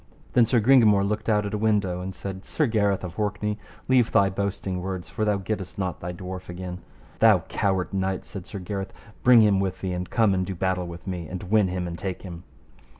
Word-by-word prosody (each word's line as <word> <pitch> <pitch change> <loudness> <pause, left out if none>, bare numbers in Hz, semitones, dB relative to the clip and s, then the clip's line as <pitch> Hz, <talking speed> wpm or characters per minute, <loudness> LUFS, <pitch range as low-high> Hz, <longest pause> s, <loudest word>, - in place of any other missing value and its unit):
Then 120 -2 +5
Sir 120 +1 +3
Gringamore 110 -4 +5
looked 105 +2 -2
out 105 -1 +2
at 100 - -4
a 105 - -1
window 100 -5 +1
and 95 +1 -5
said, 95 -1 -6
Sir 155 - 0
Gareth 100 -5 +1
of 90 +2 -6
Orkney, 105 0 -1 0.3
leave 125 -3 +4
thy 100 -1 +4
boasting 95 -1 -2
words, 95 -1 -5
for 110 - -2
thou 105 -1 +2
gettest 95 -1 -4
not 95 -3 -2
thy 90 - -4
dwarf 90 +1 -7
again. 90 0 -6 0.4
Thou - - +6
coward 95 -1 0
knight, 95 -1 -1
said 95 -3 -8
Sir - - -7
Gareth, 95 +1 -5 0.3
bring 125 -2 +7
him 105 -3 +4
with 95 -1 -2
thee, 95 -1 -2
and 90 0 -4
come 110 -4 +3
and 95 -1 +1
do 95 +1 -4
battle 90 0 -1
with 85 0 -9
me, 90 -4 -4
and 90 +2 -6
win 105 +1 +3
him 90 0 -2
and 85 0 -6
take 95 -2 -4
him. 85 -3 -8
95 Hz, 220 wpm, -25 LUFS, 90-105 Hz, 0.4 s, bring